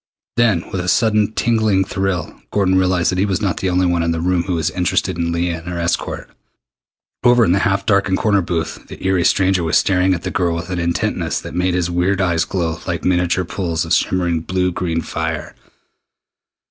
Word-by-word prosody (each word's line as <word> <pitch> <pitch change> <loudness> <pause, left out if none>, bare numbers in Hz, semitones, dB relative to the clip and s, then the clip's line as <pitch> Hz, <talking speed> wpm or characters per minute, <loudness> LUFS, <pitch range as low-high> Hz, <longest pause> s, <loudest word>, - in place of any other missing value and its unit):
Then, 110 -8 +2
with 95 - -2
a 90 - -5
sudden 105 +2 +2
tingling 110 -5 +2
thrill, 95 -4 -3
Gordon 95 -2 +1
realized 95 -2 +2
that 90 - -2
he 100 - +3
was 95 -1 0
not 100 -4 -1
the 95 - -1
only 90 +1 +2
one 85 -1 +1
in 85 - 0
the 85 0 -1
room 90 +1 +1
who 90 - -1
was 80 -1 -1
interested 90 +1 0
in 85 0 -1
Leah 85 0 -1
and 80 - -14
her 90 -1 -4
escort. 85 0 -2 1.0
Over 120 -1 +5
in 85 - +2
the 95 - +3
half 100 0 -1
darkened 100 -2 +2
corner 100 -2 +2
booth 85 -2 -4
the - - -9
eery 95 -2 +2
stranger 95 -1 +2
was 80 - +2
staring 95 -1 +2
at 85 - -7
the - - -3
girl 85 -3 0
with 85 +2 -5
an 90 - -2
intentness 85 0 -1
that - - -8
made 90 +1 0
his 90 -1 0
weird 90 +3 +1
eyes 85 -3 +1
glow 85 -3 -2
like 85 -1 -3
miniature 90 0 +1
pools 85 -3 -2
of - - 0
shimmering 85 -3 +1
blue 90 +2 -1
green 85 -2 -2
fire. - - -4
90 Hz, 210 wpm, -18 LUFS, 85-95 Hz, 1.0 s, Over